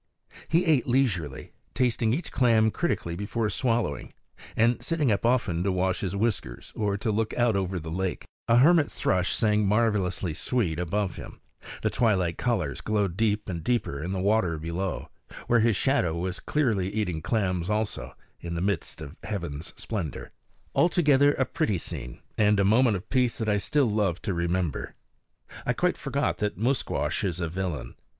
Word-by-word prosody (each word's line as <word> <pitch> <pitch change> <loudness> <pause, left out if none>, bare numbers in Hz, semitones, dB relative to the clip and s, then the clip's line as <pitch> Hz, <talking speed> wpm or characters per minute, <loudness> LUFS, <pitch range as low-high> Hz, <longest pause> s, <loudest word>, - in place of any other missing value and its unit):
He 170 +3 +2
ate 155 -7 +3
leisurely, 100 - 0 0.2
tasting 120 -3 +1
each 150 +9 -2
clam 115 -3 +3
critically 95 - -1
before 105 +3 -2
swallowing, 115 - -1 0.4
and 115 +2 +3
sitting 155 -7 +1
up 105 +3 +1
often 115 -9 +1
to 100 - +1
wash 95 0 0
his 95 -1 -3
whiskers 105 -2 -2
or 100 -2 0
to 110 +2 -1
look 110 +1 -1
out 120 -3 +2
over 95 -1 -1
the 80 0 -7
lake. 95 +2 -2 0.2
A 115 - +4
hermit 155 +3 +5
thrush 90 0 0
sang 105 -2 +2
marvelously 100 -5 +1
sweet 85 -3 -1
above 90 +2 -1
him; - - -9 0.4
the - - +1
twilight 95 -8 +1
colors 90 - -1
glowed 105 -5 0
deep 105 0 0
and 85 -4 -4
deeper 100 - -1
in 85 +4 -3
the 95 - -2
water 95 -4 +2
below, 85 +4 -3 0.4
where 120 - +3
his 115 -1 +3
shadow 95 - +1
was 90 +2 -3
clearly 110 -11 0
eating 100 -7 -2
clams 90 -2 0
also, 105 0 -2 0.2
in 85 0 -5
the - - -2
midst 100 -4 -2
of 75 +1 -8
heaven's 85 -6 -4
splendor. 95 - -4 0.4
Altogether 145 -5 +4
a 130 - +1
pretty 105 -5 0
scene, 70 -8 -7 0.2
and 105 -1 +4
a 100 - +3
moment 110 +2 +4
of 95 +4 -11
peace 125 -3 +2
that 110 - -3
I 105 -1 +3
still 140 +7 +2
love 105 -5 0
to 100 - -1
remember. 85 -2 -2 0.7
I - - +1
quite - - +1
forgot - - -1
that 105 -1 -1
Musquash 125 +3 0
is 90 -3 -1
a 85 - -1
villain. 80 -8 -4
105 Hz, 170 wpm, -27 LUFS, 90-115 Hz, 0.7 s, hermit